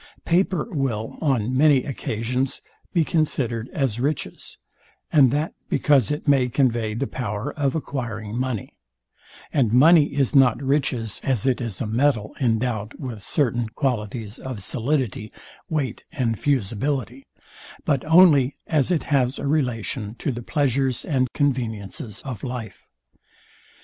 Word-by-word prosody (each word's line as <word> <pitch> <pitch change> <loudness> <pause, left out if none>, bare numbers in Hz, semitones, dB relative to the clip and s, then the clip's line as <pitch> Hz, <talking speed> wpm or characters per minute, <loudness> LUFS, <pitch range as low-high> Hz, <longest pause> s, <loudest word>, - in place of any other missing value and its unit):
Paper 180 0 +1
will, 130 - -2
on 130 -5 +1
many 140 -2 +5
occasions, 125 0 -2 0.3
be 170 -3 +3
considered 125 -8 0
as 130 -6 -1
riches, 140 +3 -3 0.6
and 140 -4 +6
that 150 +5 -1 0.2
because 140 -6 +3
it 150 +1 -3
may 135 -3 +4
convey 115 -4 +1
the 135 +4 -1
power 125 +1 -4
of 140 -2 -1
acquiring 115 -8 -4
money: 125 -4 -3 0.8
And 130 -8 +2
money 145 +4 +6
is 140 0 +1
not 130 -4 +5
riches, 130 -5 0
as 130 -4 +1
it 130 -1 +1
is 115 -5 -4
a - - -2
metal 115 -1 +1
endowed 115 -2 0
with 120 -7 -6
certain 120 -3 0
qualities 110 -3 -3
of 125 -7 -6
solidity, 120 -3 -1 0.4
weight 140 -7 -2
and 115 -5 -1
fusibility; 130 +1 -1 0.6
but 140 -4 +1
only 155 -5 +6
as 150 -3 +1
it 175 -4 +1
has 135 -2 +1
a - - -4
relation 125 -6 -1
to 140 - -2
the 120 -1 -5
pleasures 135 -1 0
and 130 -4 0
conveniences 110 -6 -2
of 130 -5 -6
life. 120 -6 -6
130 Hz, 135 wpm, -23 LUFS, 115-145 Hz, 0.8 s, and